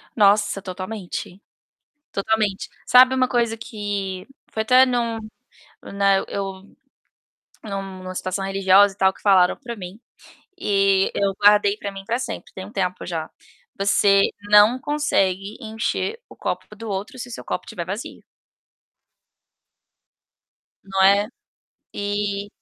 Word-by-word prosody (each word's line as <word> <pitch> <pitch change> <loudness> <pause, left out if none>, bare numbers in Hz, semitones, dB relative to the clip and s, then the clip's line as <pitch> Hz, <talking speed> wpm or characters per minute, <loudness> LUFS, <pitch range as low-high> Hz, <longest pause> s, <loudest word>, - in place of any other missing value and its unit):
Nossa, 205 -1 +3
totalmente. 185 0 -6 0.7
Totalmente. 210 -1 -1 0.2
Sabe 255 +1 +7
uma 255 -1 +2
coisa 235 -2 0
que 205 -5 -5 0.3
foi 220 - -1
até 255 +4 +6
num 235 -2 -1 0.7
né, 195 -1 +2
eu 195 -1 -5 1.0
num 200 -3 -4 0.2
em - - -12
uma 185 0 -7
situação 185 +1 -3
religiosa 195 +1 +4
e - - -34
tal, 190 -1 +3
que - - -20
falaram 185 -3 +4
pra 240 -4 -7
mim 185 0 -9 0.6
e 195 - +2
eu 200 -1 +1
guardei 205 0 +5
pra 200 -1 -6
mim 195 0 -9
pra 230 +4 -1
sempre, 255 - -6
tem 190 - -7
um 205 - -13
tempo 185 -3 -2
já: 165 -3 -4 0.5
"Você 200 0 +4 0.3
não 210 +4 +7
consegue 205 -10 0
encher 225 - -3
o - - -15
copo - - -4
do 225 +1 -8
outro 200 +8 -5
se 245 - -6
o - - -10
seu - - -8
copo - - -4
tiver 170 - -5
vazio". 200 +6 -6 2.6
Não 195 0 -1
é? 200 +2 +5 0.7
E 205 0 -2
200 Hz, 135 wpm, -22 LUFS, 195-220 Hz, 2.6 s, Sabe